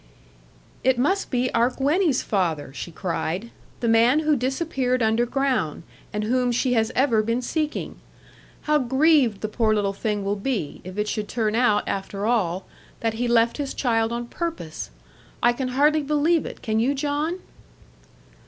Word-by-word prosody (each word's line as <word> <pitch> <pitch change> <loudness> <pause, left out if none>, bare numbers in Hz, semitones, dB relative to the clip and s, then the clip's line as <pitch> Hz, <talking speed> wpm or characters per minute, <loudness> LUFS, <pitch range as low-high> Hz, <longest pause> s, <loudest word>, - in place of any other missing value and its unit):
'It 260 -1 +3
must 340 +11 +1
be 250 -1 0
our 235 +2 +3
Gwenny's 285 +3 +1
father,' 165 -9 -1
she 160 - -6
cried; 175 +5 -3 0.3
'the 235 - 0
man 230 +5 +5
who 305 -1 +2
disappeared 260 -1 0
underground, 240 - 0 0.3
and 210 0 -2
whom 250 +2 +1
she 250 +1 +1
has 225 -2 +1
ever 250 -5 +3
been 230 +3 0
seeking. 305 +4 -3 0.6
How 300 0 +2
grieved 265 -4 +3
the 215 - -1
poor 215 0 +1
little 200 -1 0
thing 210 0 -2
will 200 +1 0
be, 200 - -3
if 185 +2 -9
it 210 0 0
should 210 -1 -2
turn 220 -2 -1
out, 225 -3 +2
after 195 +1 -3
all, 190 -6 0 0.4
that 225 -1 0
he 245 - +1
left 235 0 +3
his 285 -2 -4
child 225 -3 +1
on 240 0 -3
purpose! 320 - -5 0.5
I 240 0 +5
can 255 +1 -3
hardly 295 +4 +3
believe 300 +3 +1
it; - - -10
can 220 0 0
you, 265 +5 +2
John?' 295 +4 -1
240 Hz, 160 wpm, -24 LUFS, 215-275 Hz, 0.6 s, man